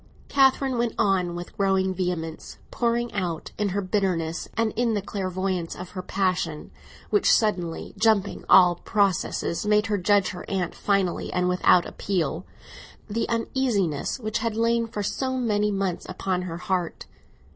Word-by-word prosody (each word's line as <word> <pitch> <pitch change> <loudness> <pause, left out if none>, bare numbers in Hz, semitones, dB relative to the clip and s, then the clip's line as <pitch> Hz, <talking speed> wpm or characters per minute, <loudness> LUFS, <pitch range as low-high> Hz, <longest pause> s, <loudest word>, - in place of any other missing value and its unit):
Catherine 270 -2 +3
went 235 -1 0
on 180 -3 +1
with 175 0 -7
growing 190 -1 +1
vehemence, 175 -3 -4
pouring 235 0 0
out 175 -5 -3
in 205 -1 +1
her 200 +2 -1
bitterness 185 -4 -1
and 225 -1 0
in 235 -1 +1
the 205 - 0
clairvoyance 185 -3 -2
of 180 0 -8
her 185 - -5
passion 180 -5 -1 0.4
(which 415 - +4
suddenly, 180 -7 0
jumping 215 -2 +2
all 180 -2 +7
processes, 195 -4 0
made 210 0 +3
her 210 -2 0
judge 200 +1 +3
her 180 - -7
aunt 185 -3 -1
finally 195 -3 0
and 180 0 +1
without 180 -1 +4
appeal) 175 -3 -2 0.6
the 220 +2 -2
uneasiness 230 - 0
which 215 -2 -2
had 225 -1 -2
lain 230 +1 +1
for 210 -2 -4
so 260 +6 -2
many 210 -4 +1
months 195 -3 -2
upon 185 0 -2
her 175 -2 -5
heart. 180 -1 -2
195 Hz, 150 wpm, -25 LUFS, 180-220 Hz, 0.6 s, all